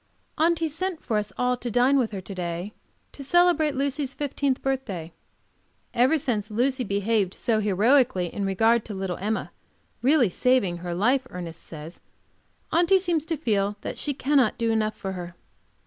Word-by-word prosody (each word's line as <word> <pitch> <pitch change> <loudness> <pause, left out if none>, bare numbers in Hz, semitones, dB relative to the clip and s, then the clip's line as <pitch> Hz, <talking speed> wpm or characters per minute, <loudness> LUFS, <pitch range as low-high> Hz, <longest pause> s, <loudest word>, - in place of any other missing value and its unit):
AUNTY 330 0 +2
sent 335 +3 -3
for 220 -3 0
us 210 -1 -5
all 250 0 +1
to 245 - -5
dine 245 +4 +3
with 235 -4 +1
her 195 -3 -6
to 195 - -7
day 175 +2 -4 0.4
to 280 - -9
celebrate 330 -1 +3
Lucy's 275 0 -1
fifteenth 280 -1 -1
birthday. 205 -12 -3 0.8
Ever 255 +7 +4
since 235 -8 -2
Lucy 255 +4 0
behaved 200 -2 0
so 225 -2 0
heroically 215 0 +3
in 200 - -3
regard 225 +4 +3
to 210 - -6
little 190 -2 -3
Emma, 215 +3 -2 0.5
really 265 -1 +4
saving 195 -2 +1
her 175 0 -5
life, 250 +7 +2
Ernest 170 -2 -7
says 160 +1 -10 0.7
Aunty 350 +3 +4
seems 345 -5 0
to 325 -1 -2
feel 205 -7 0
that - - -5
she 290 -2 -1
cannot 270 -4 +2
do 230 -1 0
enough 215 -1 0
for 195 - -4
her. 175 -2 -7
235 Hz, 165 wpm, -25 LUFS, 195-275 Hz, 0.8 s, Ever